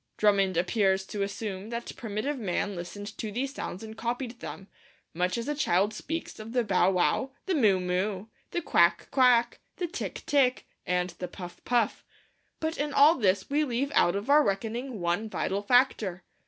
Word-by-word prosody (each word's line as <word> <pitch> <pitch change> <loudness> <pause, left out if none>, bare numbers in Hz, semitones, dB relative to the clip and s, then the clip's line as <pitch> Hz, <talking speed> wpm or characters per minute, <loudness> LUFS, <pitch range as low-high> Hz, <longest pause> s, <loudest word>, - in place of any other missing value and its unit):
Drummond 195 -4 +3
appears 190 +1 +2
to 205 +1 -5
assume 200 0 -4
that 235 0 -5
primitive 230 +5 -3
man 200 -1 -1
listened 205 +4 -7
to 215 - -3
these 265 +5 -2
sounds 190 -7 -6
and 220 0 -8
copied 240 +1 -4
them, 195 - -8 0.5
much 180 +3 0
as 235 - -4
a 295 - 0
child 205 -8 +1
speaks 325 +7 -5
of 220 +2 -8
the 245 -1 +2
bow 190 -3 +3
wow, 195 +8 +1
the 385 - 0
moo 215 - +4
moo, 185 +2 -1 0.2
the 345 - -3
quack 170 -10 +3
quack, 245 -3 +4 0.2
the 360 - -2
tick 360 +5 -5
tick, 270 -4 +2 0.2
and 180 0 0
the 180 - -3
puff 180 -1 -10
puff. 240 -3 +1 0.6
But 320 +1 -2
in 290 0 -1
all 290 +3 +7
this 200 - +1
we 295 +2 +1
leave 270 +1 -1
out 175 -7 +4
of 200 +4 -3
our 295 +2 +6
reckoning 225 +4 -2
one 175 +6 -1
vital 200 -1 -1
factor. 205 -6 +2
215 Hz, 180 wpm, -28 LUFS, 190-255 Hz, 0.6 s, all